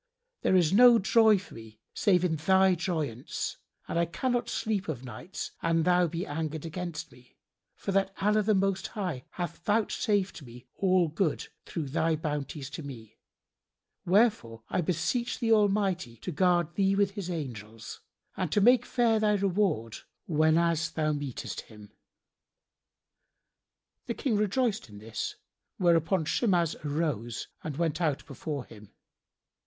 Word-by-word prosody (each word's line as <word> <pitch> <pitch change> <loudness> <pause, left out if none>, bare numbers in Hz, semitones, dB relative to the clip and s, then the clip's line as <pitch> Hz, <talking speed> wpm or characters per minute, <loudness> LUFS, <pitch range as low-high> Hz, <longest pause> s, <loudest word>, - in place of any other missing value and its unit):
There - - +3
is 175 -2 +4
no 240 +2 +8
joy 220 +1 +5
for 190 - -10
me 110 -1 -12
save 185 -4 +3
in 165 -3 +1
thy 190 +4 +4
joyance 160 - -3 0.3
and 170 - -1
I 170 - +3
cannot 245 +7 -1
sleep 210 -5 -2
o' 155 - 0
nights 125 - -7
an 165 -1 +2
thou 180 +1 +4
be 170 +3 -4
angered 155 +1 -4
against 165 -2 -5
me, 125 0 -20 0.4
for - - -4
that 195 0 +1
Allah 210 +2 +3
the 210 0 +2
Most 195 0 0
High 180 -11 -4
hath 175 -2 -4
vouchsafed 205 -3 0
me 125 -1 -12
all 185 -2 +2
good 160 +1 -1 0.2
through 155 -5 -4
thy 160 +3 +1
bounties 150 -2 -4
to 160 - -6
me: 120 -7 -10 0.8
wherefore 180 - +2
I 180 - 0
beseech 210 +9 -1
the 230 -1 0
Almighty 195 - +2
to 180 - -5
guard 175 0 +2
thee 195 -1 +2
with 200 -1 +2
His 195 -3 -6
angels, 115 - -6 0.4
and 180 -5 -2
to - - +4
make 245 +3 +5
fair 230 -3 +2
thy 210 -1 +3
reward 190 - 0 0.3
whenas 165 +1 +2
thou 155 -2 0
meetest 145 -4 -4
Him." 105 -2 -14 2.2
The - - -2
King 260 -7 0
rejoiced 215 - 0
in 105 - -12
this, 110 +1 -5 0.4
whereupon 170 -1 +2
Shimas 170 -1 +1
arose 145 -7 -2
and 150 -3 -5
went 165 0 -1
out 155 -5 0
from 140 - -11
before 145 -1 -4
him. 105 -2 -14
170 Hz, 150 wpm, -29 LUFS, 145-195 Hz, 2.2 s, no